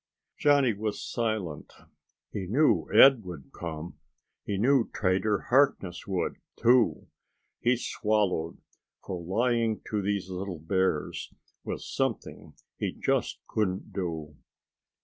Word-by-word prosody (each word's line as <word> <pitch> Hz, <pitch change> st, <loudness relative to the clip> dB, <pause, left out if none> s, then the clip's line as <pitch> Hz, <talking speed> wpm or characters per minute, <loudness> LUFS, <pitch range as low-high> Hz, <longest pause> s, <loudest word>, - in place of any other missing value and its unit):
Johnny 140 Hz, -5 st, +4 dB
was 105 Hz, +1 st, -3 dB
silent. 110 Hz, -10 st, -3 dB, 0.6 s
He 95 Hz, -3 st, -4 dB
knew 140 Hz, -, +3 dB
Ed 135 Hz, -5 st, +7 dB
would 85 Hz, -7 st, -9 dB
come. 85 Hz, 0 st, -6 dB, 0.4 s
He 100 Hz, -, -2 dB
knew 125 Hz, +3 st, +3 dB
Trader 100 Hz, +1 st, +1 dB
Harkness 125 Hz, -10 st, +2 dB
would, 95 Hz, -2 st, -1 dB, 0.2 s
too. 120 Hz, 0 st, +3 dB, 0.5 s
He 120 Hz, +1 st, +2 dB
swallowed, 105 Hz, -8 st, 0 dB, 0.5 s
for 90 Hz, -2 st, -4 dB
lying 115 Hz, +4 st, +1 dB
to 105 Hz, -2 st, 0 dB
these 100 Hz, -1 st, -1 dB
little 95 Hz, -1 st, -5 dB
bears 80 Hz, -1 st, -1 dB, 0.3 s
was -, -, -5 dB
something -, -, -3 dB, 0.2 s
he -, -, -1 dB
just -, -, -1 dB
couldn't 95 Hz, -4 st, -2 dB
do. 80 Hz, -5 st, -4 dB
100 Hz, 110 wpm, -28 LUFS, 90-115 Hz, 0.6 s, Ed